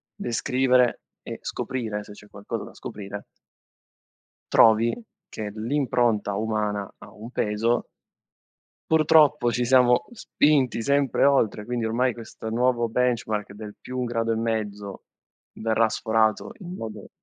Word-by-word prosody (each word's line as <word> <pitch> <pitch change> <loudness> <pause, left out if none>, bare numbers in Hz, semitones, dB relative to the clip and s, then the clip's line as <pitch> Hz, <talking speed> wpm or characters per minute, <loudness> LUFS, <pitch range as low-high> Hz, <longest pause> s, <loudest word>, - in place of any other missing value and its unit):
descrivere 125 +1 +1 0.2
e - - -7
scoprire 110 -5 -4
se 105 - -12
c'è 105 0 -15
qualcosa 100 0 -6
da - - -11
scoprire 100 0 -8 1.3
trovi 115 - +5 0.3
che 105 -2 -6
l'impronta 120 -3 0
umana 105 -2 -2
ha - - -13
un 110 +4 -10
peso 115 +1 0 1.1
purtroppo, 150 -5 +4
ci 125 0 0
siamo 125 -1 +4
spinti 145 - +1
sempre 140 +3 +2
oltre, 110 -6 +2
quindi 120 -1 -2
ormai 120 +2 +1
questo 110 -1 -9
nuovo 120 0 +1
benchmark 115 -4 -1
del 105 0 -9
+1 125 -1 -4
e 115 -1 0
mezzo, 105 -3 -3 0.5
verrà 110 0 +1
sforato 110 - 0
in 180 0 -7
modo 110 - -7
115 Hz, 120 wpm, -25 LUFS, 110-125 Hz, 1.3 s, trovi